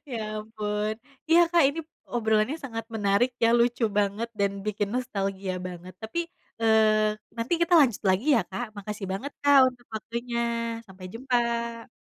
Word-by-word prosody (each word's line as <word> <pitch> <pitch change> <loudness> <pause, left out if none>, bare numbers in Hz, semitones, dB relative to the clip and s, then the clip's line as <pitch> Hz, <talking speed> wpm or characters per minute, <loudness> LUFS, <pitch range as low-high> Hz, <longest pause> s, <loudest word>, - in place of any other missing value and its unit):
ya 230 -3 -3 0.2
ampun. 215 -1 -3 0.4
Iya 335 +1 +7
Kak, 340 -3 +6
ini 300 +4 -3 0.3
obrolannya 220 +4 +1
sangat 225 -6 -6
menarik 205 +3 +2
ya, 230 - +5
lucu 235 0 +2
banget, 205 +3 0
dan 200 -1 +2 0.2
bikin 205 -1 -1
nostalgia 195 -6 -2
banget 180 +1 -10
tapi, 335 +10 -3 0.3
eee, 215 -1 +4 0.2
nanti 230 +6 -3
kita 340 +1 +3
lanjut 245 -8 +2
lagi 190 +7 +2
ya 230 - +4
Kak, 215 +3 -5
makasih 205 -1 -5
banget 265 +9 -4
Kak 285 -1 +6
untuk 245 -1 -20
waktunya, 235 +2 -3 0.5
sampai 190 -2 -11
jumpa. 235 -1 -1
225 Hz, 150 wpm, -26 LUFS, 210-245 Hz, 0.5 s, Iya